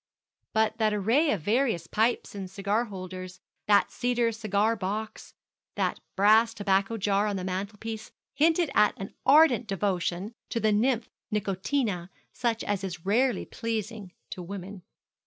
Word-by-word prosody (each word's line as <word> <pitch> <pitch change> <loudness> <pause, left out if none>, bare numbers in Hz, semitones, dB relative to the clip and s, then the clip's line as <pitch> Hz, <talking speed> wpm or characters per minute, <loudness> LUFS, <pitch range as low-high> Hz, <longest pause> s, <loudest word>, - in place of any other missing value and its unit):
But 220 +1 +1
that 215 -1 +2
array 235 +10 +2
of 200 - 0
various 220 - +1
pipes 225 +6 0
and 195 -2 -6
cigar 200 +4 0
holders 185 -2 -8 0.3
that 205 -1 +4
cedar 240 -1 +1
cigar 215 0 +1
box 210 +2 -5 0.4
that - - -1 0.2
brass 220 +3 +5
tobacco 200 +2 +1
jar 205 0 +1
on 205 - -1
the 185 - -3
mantelpiece, 205 +4 -5 0.2
hinted 320 +2 +3
at 210 - +4
an 195 - -7
ardent 275 -5 +6
devotion 195 +1 -1 0.2
to 230 - -1
the 220 -1 +2
nymph 225 +2 +1 0.2
Nicotina 200 -1 -1 0.2
such 230 -2 -1
as 200 -1 -2
is 180 -2 -6
rarely 235 +2 +2
pleasing 220 -3 -4 0.2
to 180 - -5
woman. 190 +1 -7
210 Hz, 140 wpm, -28 LUFS, 195-230 Hz, 0.4 s, ardent